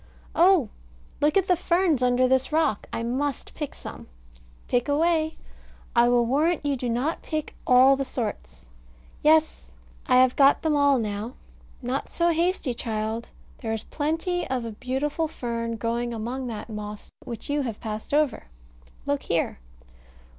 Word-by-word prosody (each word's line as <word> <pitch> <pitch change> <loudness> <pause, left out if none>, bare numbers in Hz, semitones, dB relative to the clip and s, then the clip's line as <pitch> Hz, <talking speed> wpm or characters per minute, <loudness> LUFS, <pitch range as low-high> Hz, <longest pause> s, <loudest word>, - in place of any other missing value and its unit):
Oh, 345 - +5 0.5
look 300 +5 +3
at 385 -1 +2
the 360 - +4
ferns 340 -4 +2
under 250 0 +3
this 260 +2 +1
rock! 305 -9 +1
I 230 - -3
must 265 +4 -2
pick 295 -3 -5
some. - - -9 0.6
Pick 245 +2 +1
away. 315 +1 +2 0.6
I 240 0 +5
will 240 -1 +4
warrant 300 +6 +1
you 285 -1 +1
do 250 -1 -3
not 255 +8 -1
pick 310 -2 -4
all 255 +1 +7
the 275 - -1
sorts. 200 - -5 0.5
Yes. 315 +1 +3 0.4
I 255 - +4
have 255 0 +5
got 280 0 +5
them 315 -2 +2
all 285 -1 +4
now. 215 +1 -3 0.5
Not 255 +3 -2
so 340 0 +2
hasty, 335 -5 0
child; 220 0 -3 0.3
there 225 -2 -3
is 225 - -3
plenty 325 +4 -2
of 255 -2 -1
a 230 - -4
beautiful 270 +8 -2
fern 230 -5 -3
growing 235 +2 -2
among 245 +4 -4
that 220 -3 -6
moss, 210 -1 -7
which 235 -2 -7
you 290 0 0
have 230 -6 -4
passed 215 -1 -6
over. 295 -1 +1 0.6
Look - - 0
here. - - -1
260 Hz, 155 wpm, -25 LUFS, 235-305 Hz, 0.6 s, all